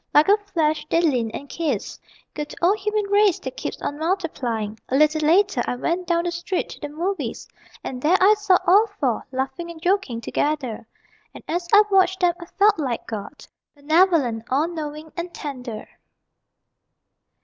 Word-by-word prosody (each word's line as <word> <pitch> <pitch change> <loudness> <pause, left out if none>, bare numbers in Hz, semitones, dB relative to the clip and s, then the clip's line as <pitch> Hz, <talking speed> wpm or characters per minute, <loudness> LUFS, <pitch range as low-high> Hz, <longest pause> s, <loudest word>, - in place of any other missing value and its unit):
Like 300 +5 +6
a 410 - +6
flash, 315 -7 -1
they 330 - +3
leaned 250 -9 +1
and 285 - -7
kissed. 285 -9 -3 0.3
Good 300 -1 -6
old 385 +5 +3
human 425 +1 -1
race 405 -3 +4
that 260 0 -6
keeps 265 - -5
on 290 - -3
multiplying! 255 - -2
A 260 - 0
little 305 +2 +3
later 335 -2 +3
I - - -1
went 340 +7 -2
down 340 -1 +1
the 350 - -1
street 345 +2 -3
to - - -10
the 295 - -6
movies, 315 - -3 0.4
And 250 -1 -5
there 335 +7 +4
I 390 +3 +6
saw 410 -3 +3
all 410 +5 +5
four, 250 -5 -1
laughing 270 +6 -3
and 335 -1 -9
joking 355 - 0
together. 260 -3 -2 0.5
And - - -11
as 345 +1 -2
I 415 0 +8
watched 380 -1 +3
them 350 -1 +4
I 340 - -9
felt 410 0 +3
like 255 -6 -2
God 210 -3 -7 0.3
Benevolent, 290 -6 +2
all 285 +5 +2
knowing, 310 -2 -6
and 345 +1 -5
tender. 250 -7 -6
320 Hz, 170 wpm, -23 LUFS, 270-370 Hz, 0.5 s, I